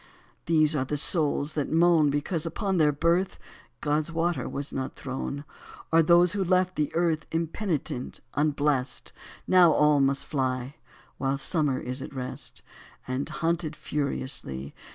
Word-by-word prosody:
These 155 -2 +4
are 135 - +1
the 150 +3 -2
souls 150 -1 +3
that 145 -3 -2
moan 165 -2 +4
Because 150 +3 -1
upon 190 +3 -1
their 150 -2 +4
birth 170 +6 +1 0.4
God's 150 +2 0
water 165 -4 -1
was 140 +1 -4
not 130 0 -4
thrown; 140 +2 -5 0.5
Or 165 0 +6
those 175 +2 +5
who 200 -1 0
left 185 0 +2
the 150 -1 -1
earth 165 -2 0
Impenitent, 165 -5 -3
unblessed. 145 -3 0 0.3
Now 180 -3 +6
all 150 -1 +4
must 135 0 +2
fly. 130 -2 -2 0.5
While 135 0 0
summer 145 -2 0
is 125 +2 -5
at 140 - -8
rest. 125 -1 -6 0.4
And, 130 +2 -2
hunted 165 -1 -1
furiously. 130 - -3
150 Hz, 140 wpm, -27 LUFS, 140-165 Hz, 0.5 s, Or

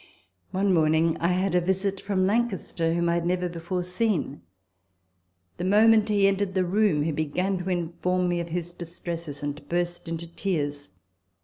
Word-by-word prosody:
One 195 +1 +1
morning 160 0 +3
I 170 - +1
had 185 +1 +1
a 180 - +4
visit 190 +2 -1
from 195 -2 0
Lancaster, 190 -6 0
whom 170 0 +1
I 170 - +2
had 170 0 0
never 180 0 0
before 175 +1 -3
seen. 180 - -1 1.2
The - - -4
moment 215 +3 +5
he 200 -2 +4
entered 195 -1 0
the 185 -1 +2
room, 190 -5 +2
he 160 - 0
began 180 +6 -1
to 180 +1 -4
inform 180 +1 0
me 175 -1 0
of 170 0 -4
his 175 +1 -3
distresses, 170 -3 -7
and 145 +1 -5
burst 175 0 -2
into 165 0 -4
tears. 150 - -3
175 Hz, 170 wpm, -26 LUFS, 165-190 Hz, 1.2 s, moment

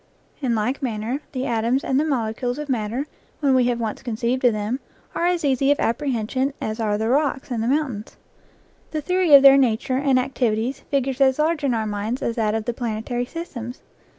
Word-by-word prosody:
In 245 -4 +1
like 245 +7 -1
manner 240 +2 -2
the 260 -1 -3
atoms 235 +3 0
and 265 +1 +1
the - - +2
mole 270 -7 0
NEW 220 - -3
GLEANINGS - - -21
IN 250 - -2
OLD 245 - 0
FIELDS - - -13
cules 300 - -3
of 295 - -13
matter, 240 +3 -1 0.3
when 280 -3 +2
we 255 -1 +4
have 240 -1 0
once 225 -2 -3
conceived 240 +2 -2
of 245 - +6
them, 215 +5 -2 0.3
are 345 - 0
as 355 -3 0
easy 275 0 +2
of 290 - +2
apprehension 260 +2 -1
as 220 +1 -4
are 210 -2 0
the 220 +1 -1
rocks 270 +1 0
and 235 -2 -1
the 225 - -1
mountains. 260 -6 -2 0.7
The 310 - -3
theory 360 -1 +4
of 275 - +8
their 275 0 +9
nature 255 0 +1
and 270 -1 +2
activities 250 -1 0
figures 270 -1 -1
as 265 -1 +4
large 310 0 +1
in 260 -4 +1
our 220 -1 -1
minds 210 +4 -3
as 230 - -1
that 215 -1 +1
of 220 -1 -2
the 240 - -1
planetary 235 +1 -3
systems. 250 -8 -7
255 Hz, 230 wpm, -22 LUFS, 225-275 Hz, 0.7 s, their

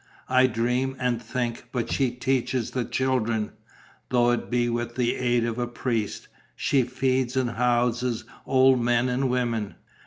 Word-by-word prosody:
I 130 0 +5
dream 125 +3 0
and 125 -2 0
think; 120 0 -3
but 120 -3 -2
she 135 -3 +2
teaches 125 -1 -1
the 125 -2 -1
children, 115 -5 0 0.6
though 120 -1 +3
it 120 - -2
be 120 0 +1
with 120 0 -2
the 125 -2 +1
aid 120 -2 +1
of 115 0 -3
a 120 - -1
priest; 120 -3 -3 0.3
she 135 - +2
feeds 130 0 0
and 125 -2 +1
houses 120 0 0 0.2
old 130 -1 +5
men 120 +1 +2
and 130 +1 0
women." 120 -4 -1
125 Hz, 155 wpm, -25 LUFS, 120-130 Hz, 0.6 s, I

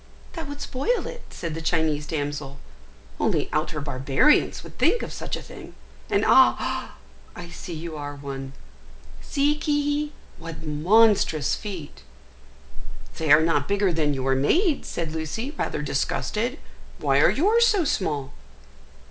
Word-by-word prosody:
"That 325 -3 -6
would 285 0 -7
spoil 420 - -1
it," 485 - -7
said 165 -2 -5
the 165 - -5
Chinese 160 -3 0
damsel; 145 -2 -4 0.6
"only - - 0
outer 155 0 -1
barbarians 140 - +2
would - - -13
think 475 - +3
of - - -6
such - - -4
a - - -9
thing. - - -11 0.3
And, - - +2
ah! - - +3 0.4
I 175 -1 -8
see 170 0 -7
you 160 0 -6
are 145 -1 -6
one! 135 -1 -7 0.7
See, 290 +1 +1
Ki 290 0 0
hi, - - -16 0.3
what 165 -1 -8
monstrous 160 0 +3
feet!" 185 -8 -6 1.2
"They 160 -3 0
are 150 +1 +8
not 155 -4 +1
bigger 200 -2 +1
than 150 -3 +1
your 135 0 0
maid's," 295 - +2
said 165 -2 -3
Lucy, 160 - -4
rather 150 - -2
disgusted. 215 - -1 0.4
"Why - - +2
are - - +6
yours 445 - +4
so 405 -6 +3
small?" 145 - -1
165 Hz, 145 wpm, -24 LUFS, -, 1.2 s, are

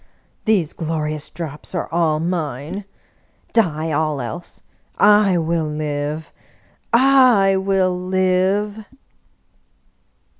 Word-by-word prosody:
These 200 -9 +1
glorious 155 -2 -3
drops 155 +1 -7
are 175 - -2
all 165 -2 +1
mine! 165 +1 -3 0.7
Die 160 -8 +1
all 155 -1 0
else! 120 +7 -7 0.3
I 205 -3 +5
will 165 -1 0
live, 150 0 -4 0.6
I 245 -6 +5
will 190 -1 +1
live 190 +3 0
175 Hz, 85 wpm, -20 LUFS, 155-195 Hz, 0.7 s, I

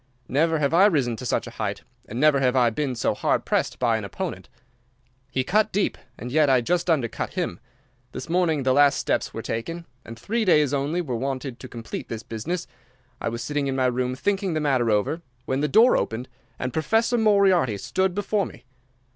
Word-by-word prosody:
Never 160 +4 +2
have 145 0 0
I 190 +4 +7
risen 135 - +1
to 125 - -5
such - - 0
a 120 - -8
height, 100 -1 -3 0.2
and 115 - -5
never 150 -1 +4
have 130 -1 +2
I 120 -3 +4
been 135 +2 -2
so 115 - 0
hard - - 0
pressed - - 0
by 115 -3 +2
an 110 - -5
opponent. 100 - -5 0.8
He 130 - -1
cut 210 +8 +2
deep, 200 +1 0 0.2
and 125 +3 -7
yet 150 0 +4
I 130 -1 +5
just 175 +8 0
undercut 135 -8 0
him. 85 - -2 0.5
This - - -7
morning 165 -4 +1
the 130 0 +3
last 145 +1 +5
steps - - -1
were - - -6
taken, 165 +10 -4 0.2
and 115 0 -10
three 225 - -1
days 150 -8 +3
only 145 +5 0
were 130 -8 -3
wanted 130 0 -4
to 130 - -8
complete 115 -2 -7
the 115 0 -6
business. 160 +11 -3 0.6
I - - -1
was 115 0 -5
sitting 145 +2 -1
in 135 - -1
my 130 -1 +1
room 125 0 0
thinking 195 +3 -1
the - - +1
matter 130 -6 +1
over, 105 +10 +1 0.2
when 130 +1 -1
the 150 - +2
door 225 - +5
opened 120 +3 -2 0.3
and 125 -1 -4
Professor 225 +9 +1
Moriarty 195 - +3
stood 180 - -1
before 205 0 0
me. - - -14
140 Hz, 205 wpm, -24 LUFS, 120-175 Hz, 0.8 s, I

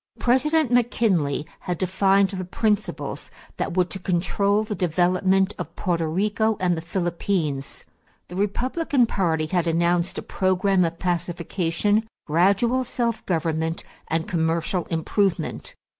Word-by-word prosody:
President 270 +3 +2
McKinley 200 - +2
had 180 -1 -3
defined 195 +2 +3
the 185 -2 -4
principles 210 +3 -2 0.3
that 185 - -3
were 180 - +5
to 180 +2 -6
control 195 +3 +1
the 215 - -4
development 185 +2 +2
of - - -6
Porto 170 -3 -1
Rico 210 +6 +1
and 180 -1 +2
the 160 - -4
Philippines. 170 -5 -2 0.4
The 180 - -9
Republican 255 - +1
party 165 -7 0
had 175 +1 0
announced 170 +2 +1
a - - -4
program 185 0 +1
of 165 0 -3
pacification, 175 +4 0 0.2
gradual 200 +10 +2
self 235 -2 -2
government, 160 -1 -1 0.2
and 165 +1 -1
commercial 165 +1 0
improvement. 180 +3 -1
185 Hz, 125 wpm, -24 LUFS, 170-205 Hz, 0.4 s, were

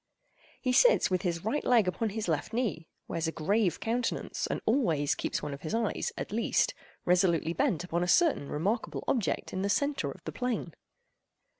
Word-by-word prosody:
He 255 -1 0
sits - - +5
with 185 - +1
his 170 -2 -2
right 260 +7 0
leg 230 -6 +4
upon 220 +5 0
his 215 0 -4
left 160 +5 -1
knee, 215 -9 -1 0.2
wears 165 -1 -2
a - - -1
grave 190 +4 +1
countenance, 235 +1 -2
and - - -2
always 165 - +2
keeps - - -3
one 145 - -3
of 140 - -8
his 155 - -3
eyes, 225 -3 -1
at - - -5
least, 225 +2 +1 0.3
resolutely 175 -2 +3
bent 215 - +1
upon 175 -1 -1
a 180 - 0
certain 260 - +3
remarkable 200 +10 -1
object 235 -7 -1
in 185 - -2
the 200 - 0
centre 285 +7 0
of - - -10
the - - -5
plain. 235 -9 -3
195 Hz, 185 wpm, -30 LUFS, 170-235 Hz, 0.3 s, sits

